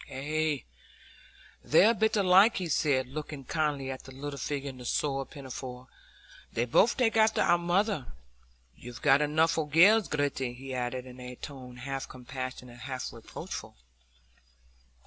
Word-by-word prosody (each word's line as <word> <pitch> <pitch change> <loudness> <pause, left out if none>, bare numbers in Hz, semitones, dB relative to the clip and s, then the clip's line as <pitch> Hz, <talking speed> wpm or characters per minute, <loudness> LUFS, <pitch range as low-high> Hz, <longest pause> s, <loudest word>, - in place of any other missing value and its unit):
"Ay, 150 +2 -1 1.0
they're 195 +8 +6
a - - +1
bit 220 -1 +1
alike," 195 +3 +6
he 180 - -2
said, 140 -4 +2
looking 145 +1 -7
kindly 145 -3 -1
at 130 - -7
the 135 - -12
little 140 +1 -6
figure 140 -1 -3
in 130 - -14
the 125 - -9
soiled 135 +1 -1
pinafore. 130 -3 -8 0.6
"They 120 - 0
both 195 - +3
take 235 -4 +2
after 220 0 +4
our 175 - +4
mother. 175 - 0 0.6
You've 120 0 -11
got 135 +2 +5
enough 160 +2 +2
o' 160 - 0
gells, 185 +9 +6
Gritty," 140 -4 -1
he 135 +1 -8
added, 125 0 -3
in 130 0 -11
a 125 0 -8
tone 130 -2 -9
half 135 +2 -5
compassionate, 130 -1 -7
half 130 0 -5
reproachful. 115 - -8
140 Hz, 150 wpm, -29 LUFS, 130-160 Hz, 1.0 s, they're